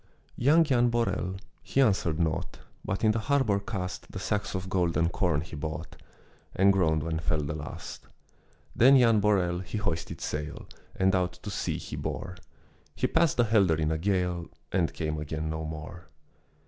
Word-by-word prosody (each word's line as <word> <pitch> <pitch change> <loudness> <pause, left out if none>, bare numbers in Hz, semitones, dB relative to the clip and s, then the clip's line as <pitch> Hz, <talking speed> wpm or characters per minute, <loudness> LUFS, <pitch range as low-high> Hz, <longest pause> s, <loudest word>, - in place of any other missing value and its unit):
Young 150 +7 +5
Jan 125 -5 +3
Borel, 100 -5 -1 0.3
he - - -2
answered 95 - +2
naught, 80 -3 -1 0.3
But 95 +3 -3
in 110 - +5
the 110 - -1
harbor 115 -4 +2
cast 100 -3 -5
The - - -7
sacks 105 -1 -2
of 95 0 -3
golden 85 -3 +1
corn 85 -4 +1
he 80 0 -8
brought, 75 +2 -5 0.6
And 100 +1 +5
groaned 80 -5 +2
when 80 0 -2
fell 80 -1 0
the 70 +1 -3
last. 75 -2 -8 0.7
Then 135 +4 +7
Jan 115 -4 +5
Borel, 95 -4 +2
he 95 +4 -5
hoisted 85 -5 -3
sail, 75 +1 -4 0.3
And 95 0 +2
out 90 -1 +1
to 105 - -8
sea - - -2
he - - -7
bore; 95 -1 -4 0.6
He - - 0
passed 165 -3 +2
the 120 - +5
Helder 100 -7 +3
in 80 0 0
a 80 - -1
gale 90 -2 0 0.2
And 85 -3 +1
came 80 -2 -3
again 80 +1 -3
no 80 0 -4
more. 80 +2 -8
90 Hz, 175 wpm, -28 LUFS, 80-105 Hz, 0.7 s, Then